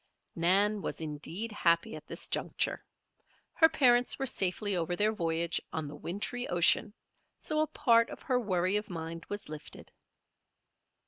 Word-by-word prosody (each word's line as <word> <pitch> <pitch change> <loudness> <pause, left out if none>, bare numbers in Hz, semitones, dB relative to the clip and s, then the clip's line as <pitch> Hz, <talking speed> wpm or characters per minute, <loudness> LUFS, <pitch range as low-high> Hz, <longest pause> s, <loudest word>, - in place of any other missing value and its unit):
Nan 200 +5 +3
was - - -4
indeed 160 +8 -4
happy 175 +2 +1
at - - -11
this - - -3
juncture. - - -1 0.7
Her 320 -1 +5
parents 245 -4 +4
were 270 - -2
safely 200 -4 +1
over 175 0 -1
their 210 +4 +2
voyage 170 -3 -1
on 160 -2 -3
the 145 - -8
wintry 205 +10 -4
ocean, 175 +4 +3 0.5
so 305 0 -2
a 310 - +2
part 230 -5 +3
of - - -10
her 255 -4 +1
worry 185 -3 +1
of 210 0 -5
mind 165 -1 -6
was 205 0 -5
lifted. 150 -1 -9
195 Hz, 150 wpm, -31 LUFS, 170-230 Hz, 0.7 s, Her